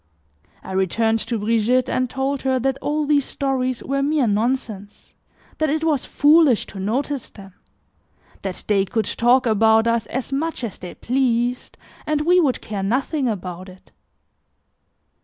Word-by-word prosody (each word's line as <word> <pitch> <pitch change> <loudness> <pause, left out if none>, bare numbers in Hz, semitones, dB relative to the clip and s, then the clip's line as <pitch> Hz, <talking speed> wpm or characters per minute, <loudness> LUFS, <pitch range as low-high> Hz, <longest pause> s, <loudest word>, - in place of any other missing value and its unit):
I - - -8
returned 220 +4 +1
to 230 +1 -2
Brigitte 230 +4 +1
and 255 -1 -1
told 270 +2 -2
her 260 -1 +1
that 270 +1 -1
all 300 +1 -1
these 290 -1 +3
stories 255 -3 -2
were 275 0 -1
mere 290 -1 +1
nonsense, 215 -2 -2 0.5
that 310 -1 +1
it 310 +2 -1
was 305 -5 0
foolish 295 -5 +4
to 195 - -7
notice 260 +7 -2
them; 195 -2 -14 0.9
that 190 -2 -5
they 200 -2 +3
could 215 +3 -2
talk 250 +2 +2
about 220 0 +4
us 230 -1 0
as 260 +2 -4
much 305 0 -2
as 220 -5 -5
they 180 -1 -8
pleased 245 -1 -1 0.3
and 305 -1 +1
we 355 +4 +4
would 285 -7 +1
care 205 -2 -5
nothing 260 +6 0
about 185 -3 -5
it. 185 0 -17
250 Hz, 155 wpm, -21 LUFS, 215-275 Hz, 0.9 s, foolish